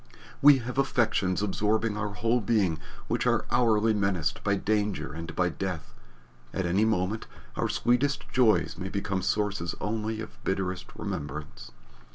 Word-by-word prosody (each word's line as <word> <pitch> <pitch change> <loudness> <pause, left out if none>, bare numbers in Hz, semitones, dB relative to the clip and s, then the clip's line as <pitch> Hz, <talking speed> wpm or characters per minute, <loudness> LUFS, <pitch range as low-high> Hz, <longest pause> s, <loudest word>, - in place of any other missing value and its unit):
We 145 -1 +9
have 125 +1 -3
affections 105 -8 +1
absorbing 105 +2 +1
our 105 0 -2
whole 115 +5 +1
being 95 -7 +1 0.3
which - - 0
are - - +2
hourly 115 -2 +3
menaced 100 -7 0
by 100 -1 +2
danger 105 -6 -1
and 80 +1 -6
by 90 -1 +2
death 85 -8 -4 0.6
at 95 - -1
any 95 +5 +3
moment 105 0 0 0.3
our - - 0
sweetest 130 +4 +1
joys 110 -9 +3
may 95 0 -4
become 100 -1 -2
sources 100 -3 -1
only 110 +1 -2
of 110 - -9
bitterest 95 -1 -2
remembrance. 75 -7 -5
105 Hz, 145 wpm, -28 LUFS, 90-110 Hz, 0.6 s, We